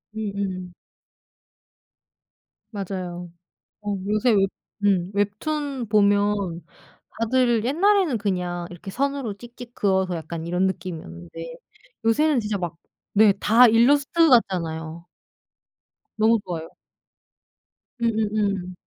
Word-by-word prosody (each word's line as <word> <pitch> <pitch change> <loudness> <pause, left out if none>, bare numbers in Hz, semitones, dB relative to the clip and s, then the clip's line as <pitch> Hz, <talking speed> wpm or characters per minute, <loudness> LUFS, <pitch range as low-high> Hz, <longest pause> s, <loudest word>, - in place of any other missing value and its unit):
음음. 195 -4 -4 2.0
맞아요. 180 -4 -5 0.5
어 205 -1 -2
요새 215 +4 +2
웹 195 -2 +3 0.3
음 190 -2 +2
웹툰 255 +5 -2
보면 205 -5 +2 0.6
다들 235 -1 +2
옛날에는 345 - +2
그냥 180 -3 -2
이렇게 175 +3 -9
선으로 275 -3 -2
찍찍 240 +2 -12
그어서 190 -3 +1
약간 165 0 -6
이런 180 +2 +1
느낌이었는데 170 - -6 0.5
요새는 290 +3 +3
진짜 210 -2 -2
막 170 -2 -4 0.4
네 210 -1 +6
다 235 +4 +6
일러스트 285 +8 +4
같잖아요. 170 -7 +1 1.1
너무 220 +1 +4
좋아요. 165 -3 -5 1.3
음음음. 210 -5 0
205 Hz, 215 characters per minute, -24 LUFS, 180-235 Hz, 2.0 s, 네